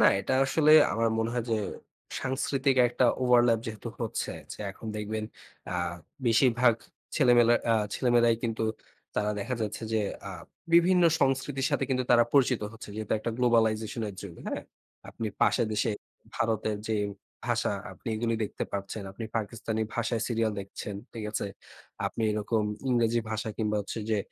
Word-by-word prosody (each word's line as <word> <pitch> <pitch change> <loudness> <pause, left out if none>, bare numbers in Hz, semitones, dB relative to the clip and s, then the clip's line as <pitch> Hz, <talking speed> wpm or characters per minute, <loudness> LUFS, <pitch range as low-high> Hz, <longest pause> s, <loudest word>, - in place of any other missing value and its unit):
না, - - +6 0.2
এটা 100 - -2
আসলে 155 +2 +3 0.2
আমার 115 0 +2
মনে 115 +1 0
হয় 120 - -1
যে 110 - +3 0.6
সাংস্কৃতিক 135 +1 0
একটা 125 - +1 0.2
ওভারল্যাপ 120 -2 +5
যেহেতু 110 -2 -5
হচ্ছে - - -2 0.2
যে - - -16
এখন 110 - -11
দেখবেন 110 +1 -3 0.4
অ্যা 90 - -4 0.5
বেশিরভাগ 120 0 +4 0.4
ছেলেমেয়েরা 120 -4 +6 0.2
আ - - +4 0.2
ছেলেমেয়েরাই 120 -2 +3
কিন্তু 115 -1 -1 0.5
তারা 105 0 +1
দেখা 125 +6 -2
যাচ্ছে 105 +2 -4
যে 110 - +2 0.3
আ - - -5 0.4
বিভিন্ন 180 +1 +6 0.2
সংস্কৃতির 135 0 +1
সাথে - - +1
কিন্তু 130 -1 +1
তারা 120 -1 +7
পরিচিত 130 -3 +4
হচ্ছে। 115 - -10
যেহেতু 110 -1 -3
একটা 115 - -3
গ্লোবালাইজেশন 115 -2 +2
এর 100 - -7
যুগ, 95 -4 -8
হ্যাঁ? - - -3 0.5
আপনি 115 - -4
পাশের 120 - +3
দেশে 110 +1 +1 0.5
ভারতের 110 -1 0
যে 110 - +1 0.5
ভাষা - - +1 0.2
আপনি - - -8
এগুলো 115 +1 0
দেখতে - - -4
পাচ্ছেন। 100 +2 -4
আপনি 115 - -6
পাকিস্তানি 110 0 -3
ভাষায় 115 -1 0
সিরিয়াল 115 -2 +1
দেখছেন। 100 +1 -7 0.2
ঠিক 110 -2 -6
আছে? 105 - -1 0.6
আপনি 115 - -3
এরকম 105 +1 0 0.3
ইংরেজি 120 -2 +3
ভাষা 110 0 -2
কিংবা 105 -1 0
হচ্ছে 100 +3 -5
যে 110 - +2
115 Hz, 155 wpm, -29 LUFS, 110-125 Hz, 0.6 s, তারা